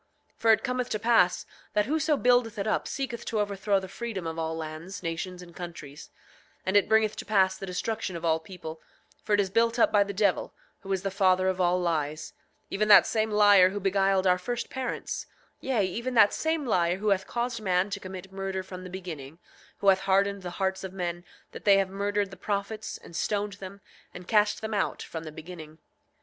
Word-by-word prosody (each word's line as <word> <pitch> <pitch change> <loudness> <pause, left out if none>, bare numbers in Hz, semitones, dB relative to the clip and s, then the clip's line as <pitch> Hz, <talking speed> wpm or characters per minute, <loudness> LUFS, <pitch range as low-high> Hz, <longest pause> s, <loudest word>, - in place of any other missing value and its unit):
8:25 - - -43
For 225 - +5
it 220 - +3
cometh 250 -1 -1
to - - 0
pass 225 -5 +3 0.3
that 210 0 +2
whoso 305 +2 +1
buildeth 245 -3 +3
it 200 - -2
up 215 - 0
seeketh 240 -4 -4
to 220 - -1
overthrow 200 -1 +1
the 190 - -8
freedom 200 -2 -5
of 165 0 -4
all 160 0 -2
lands, 160 +4 -7
nations, 180 +2 -4
and 170 -1 -15
countries; 160 -5 -9 0.6
and 190 - 0
it 205 - +4
bringeth 220 -1 +3
to - - -4
pass 190 -3 +3
the 195 - -7
destruction 190 +1 -3
of 170 0 -5
all 160 -1 +2
people, 160 -2 -9 0.4
for 210 - +1
it - - 0
is 195 -2 +1
built 230 +2 +2
up 235 - +4
by 205 -1 +5
the 200 - -5
devil, 200 -1 0 0.2
who 195 -2 -8
is 190 -1 -1
the 195 - -1
father 185 -1 +3
of 185 0 0
all 180 0 +3
lies; 155 -3 -2 0.4
even 215 +2 0
that 205 -2 +9
same 220 0 0
liar 205 -3 +6
who 205 +2 -4
beguiled 195 0 +2
our 180 -1 +4
first 240 +5 -4
parents, 260 -1 -4 0.3
yea, 245 -7 0
even 235 +7 -3
that 210 -3 +6
same 320 -2 -1
liar 175 -6 +2
who 210 +2 -1
hath 190 -1 +1
caused 240 -1 -2
man 185 0 +1
to 200 - -3
commit 190 0 -9
murder 190 -1 -3
from 185 -1 -9
the 185 - -8
beginning; 165 -6 -7 0.4
who 200 - +5
hath 190 -1 +5
hardened 195 +1 +1
the 180 - -5
hearts 190 -1 -1
of 190 -1 -6
men 175 -2 -3 0.3
that - - -10
they 200 -1 +6
have 195 -1 0
murdered 200 0 -1
the - - -9
prophets, 210 +2 -3
and 170 - -14
stoned 205 +2 -1
them, 195 +1 -9 0.3
and 180 0 -9
cast 210 -1 +2
them 220 0 -4
out 205 - -1
from 165 -1 -7
the 155 - -7
beginning. 160 -1 -10
195 Hz, 215 wpm, -28 LUFS, 180-215 Hz, 0.6 s, that